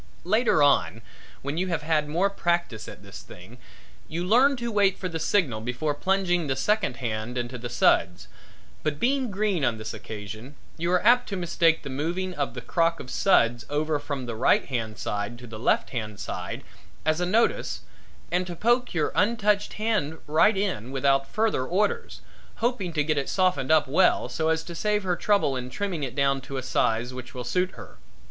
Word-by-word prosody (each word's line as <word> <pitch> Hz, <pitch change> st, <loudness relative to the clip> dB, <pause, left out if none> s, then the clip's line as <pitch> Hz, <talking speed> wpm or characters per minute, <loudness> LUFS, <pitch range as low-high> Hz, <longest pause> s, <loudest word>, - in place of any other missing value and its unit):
Later 210 Hz, -4 st, +3 dB
on 115 Hz, -7 st, +2 dB, 0.4 s
when 140 Hz, +4 st, -2 dB
you 185 Hz, -, 0 dB
have 165 Hz, -4 st, -2 dB
had 150 Hz, -1 st, +1 dB
more 180 Hz, +6 st, +1 dB
practice 170 Hz, -, -1 dB
at -, -, -10 dB
this 100 Hz, 0 st, -10 dB
thing 95 Hz, +8 st, -13 dB, 0.5 s
you 170 Hz, +2 st, -3 dB
learn 255 Hz, +8 st, +5 dB
to 235 Hz, -1 st, -3 dB
wait 200 Hz, -2 st, +3 dB
for 185 Hz, -, -3 dB
the 165 Hz, -2 st, -4 dB
signal 155 Hz, -, +1 dB
before 125 Hz, +6 st, -2 dB
plunging 180 Hz, 0 st, 0 dB
the 135 Hz, -, 0 dB
second 205 Hz, -, 0 dB
hand 115 Hz, 0 st, -3 dB
into 120 Hz, +1 st, -3 dB
the 120 Hz, 0 st, -5 dB
suds, 90 Hz, -7 st, +2 dB, 0.5 s
but 150 Hz, -1 st, -2 dB
being 260 Hz, 0 st, +1 dB
green 200 Hz, -5 st, 0 dB
on 120 Hz, -4 st, +1 dB
this 110 Hz, 0 st, -6 dB
occasion, 110 Hz, +4 st, -8 dB, 0.2 s
you 170 Hz, +2 st, -1 dB
are 180 Hz, +2 st, +2 dB
apt 245 Hz, +2 st, +5 dB
to 200 Hz, -, -3 dB
mistake 165 Hz, -2 st, +2 dB
the -, -, -6 dB
moving 175 Hz, +7 st, -2 dB
of 140 Hz, -6 st, -3 dB
the 125 Hz, -, -5 dB
crock 165 Hz, +4 st, +1 dB
of 125 Hz, -, -8 dB
suds 120 Hz, -10 st, +3 dB
over 150 Hz, +1 st, 0 dB
from 145 Hz, -3 st, -4 dB
the 120 Hz, -, -4 dB
right 110 Hz, -, +3 dB
hand 115 Hz, -5 st, -3 dB
side 105 Hz, +3 st, -3 dB
to 125 Hz, -, -11 dB
the 110 Hz, -2 st, -9 dB
left -, -, +1 dB
hand 110 Hz, -5 st, -5 dB
side -, -, -5 dB, 0.4 s
as 155 Hz, +2 st, +1 dB
a -, -, +2 dB
notice 225 Hz, +5 st, +1 dB, 0.5 s
and 180 Hz, +1 st, 0 dB
to 175 Hz, -, -5 dB
poke 240 Hz, +3 st, +1 dB
your 155 Hz, -, +1 dB
untouched 210 Hz, -1 st, +1 dB
hand 210 Hz, -8 st, -1 dB
right 165 Hz, +8 st, +4 dB
in 180 Hz, -, -2 dB
without 135 Hz, 0 st, +2 dB
further 215 Hz, -11 st, +1 dB
orders, 195 Hz, +9 st, -1 dB, 0.3 s
hoping 230 Hz, -7 st, -1 dB
to 155 Hz, -2 st, +1 dB
get 155 Hz, -1 st, +1 dB
it 135 Hz, -, -3 dB
softened 180 Hz, -9 st, +1 dB
up 155 Hz, -2 st, +4 dB
well 180 Hz, +7 st, +3 dB
so 160 Hz, 0 st, -1 dB
as 160 Hz, 0 st, +1 dB
to 170 Hz, -, -8 dB
save 210 Hz, +4 st, 0 dB
her 180 Hz, -2 st, 0 dB
trouble 200 Hz, -6 st, +2 dB
in 125 Hz, 0 st, -4 dB
trimming 180 Hz, +3 st, -3 dB
it 130 Hz, -3 st, -4 dB
down 135 Hz, -1 st, +2 dB
to 135 Hz, +1 st, -6 dB
a 130 Hz, -, -3 dB
size 120 Hz, 0 st, 0 dB
which 130 Hz, +1 st, -9 dB
will 125 Hz, -, -4 dB
suit 180 Hz, +10 st, 0 dB
her. -, -, -12 dB
155 Hz, 195 wpm, -26 LUFS, 125-190 Hz, 0.5 s, learn